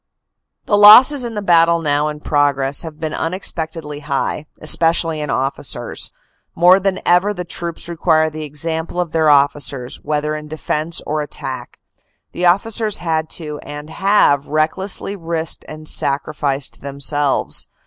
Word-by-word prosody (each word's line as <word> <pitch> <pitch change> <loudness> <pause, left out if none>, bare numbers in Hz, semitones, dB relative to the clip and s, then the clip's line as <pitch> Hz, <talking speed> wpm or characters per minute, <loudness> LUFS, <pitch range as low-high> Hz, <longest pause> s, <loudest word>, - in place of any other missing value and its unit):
" - - -58
The 205 - +2
losses 250 +7 +8
in 235 -2 -4
the 210 - -3
battle 170 -2 +4
now 150 -1 0
in 150 0 -6
progress 145 -2 +1
have 160 -2 -8
been 155 -1 -4
unex 185 +4 -2
pectedly 160 -3 -6
high, 145 +1 -3
especially 165 0 +2
in 150 - -4
officers. 135 +1 -2 0.5
More 180 +3 +6
than 190 -1 -1
ever 185 +4 +3
the 180 -1 -5
troops 170 -1 -5
require 160 -2 +1
the 155 0 -6
example 160 +3 -3
of 175 -3 -2
their 160 -1 +2
officers, 140 -3 +1
whether 150 0 -2
in 150 0 -6
defense 155 +1 -2
or 155 0 -2
attack. 130 -4 -7 0.5
The 180 0 0
officers 210 +4 +1
had 160 -2 -2
to, 150 -3 -7
and 150 +1 -9
have, 160 -6 +2
recklessly 175 +6 -2
risked 165 -3 -4
and 155 0 -9
sacrificed 140 -1 -1
themselves. 140 0 -1
155 Hz, 150 wpm, -18 LUFS, 145-175 Hz, 0.5 s, losses